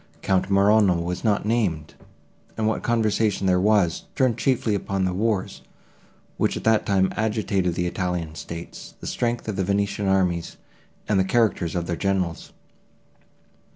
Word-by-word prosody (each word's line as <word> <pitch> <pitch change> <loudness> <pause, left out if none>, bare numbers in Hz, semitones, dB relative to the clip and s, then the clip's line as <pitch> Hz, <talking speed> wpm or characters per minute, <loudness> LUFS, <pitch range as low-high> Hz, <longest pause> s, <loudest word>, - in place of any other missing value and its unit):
Count 95 0 +1
Morano 100 -2 +4
was 85 +1 -4
not 105 -3 +1
named, 100 -10 -1 0.6
and 110 - 0
what 110 - 0
conversation 110 -3 +1
there 90 -1 +3
was, 100 -4 +2
turned 130 -4 +2
chiefly 120 -3 0
upon 95 -1 -1
the 90 - -1
wars 105 0 -1 0.8
which - - 0
at - - -7
that 110 -1 +2
time 95 -1 +2
agitated 100 -5 0
the 90 - -1
Italian 90 -3 -2
states, 85 +2 -9
the - - -10
strength 120 -1 -2
of 110 - -3
the 95 - +1
Venetian 100 +1 -1
armies, 90 -3 0 0.5
and 105 -2 +2
the - - +4
characters 95 -5 +1
of 85 -1 -1
their 85 - -2
generals. 95 -3 -2
100 Hz, 155 wpm, -24 LUFS, 90-110 Hz, 0.8 s, Morano